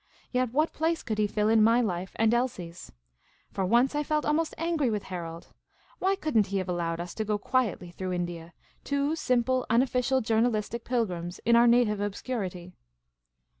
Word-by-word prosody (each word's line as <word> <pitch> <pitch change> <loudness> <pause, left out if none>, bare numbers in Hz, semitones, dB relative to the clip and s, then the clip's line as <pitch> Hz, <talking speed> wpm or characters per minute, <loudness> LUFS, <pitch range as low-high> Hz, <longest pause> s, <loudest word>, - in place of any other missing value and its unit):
Yet 250 -2 0
what 305 +5 +1
place 325 +1 -1
could 215 -2 -3
he 210 - +3
fill 210 +1 0
in 220 0 +4
my 230 +2 +5
life 190 -5 -2
and 225 +1 +2
Elsie's? 185 -9 -3 0.6
For 195 - -2
once, 240 +8 +3
I 295 - 0
felt 300 0 -1
almost 315 +2 0
angry 330 -5 0
with 210 -2 -2
Harold. 170 -2 -7 0.5
Why 385 +1 +2
could 310 -8 -4
n't 215 -3 +4
he 200 - -2
have 190 -1 -2
allowed 170 -2 -2
us 175 0 -5
to 220 - -2
go 210 -1 0
quietly 205 -6 -1
through 185 +1 -4
India, 175 -1 -4 0.3
two 280 +2 0
simple 255 -3 +1
unofficial 250 +2 +2
journalistic 225 0 0
pilgrims, 180 -8 -2
in 235 - +5
our 235 +1 +6
native 235 -3 +3
obscurity 195 -4 -4
225 Hz, 175 wpm, -28 LUFS, 185-255 Hz, 0.6 s, our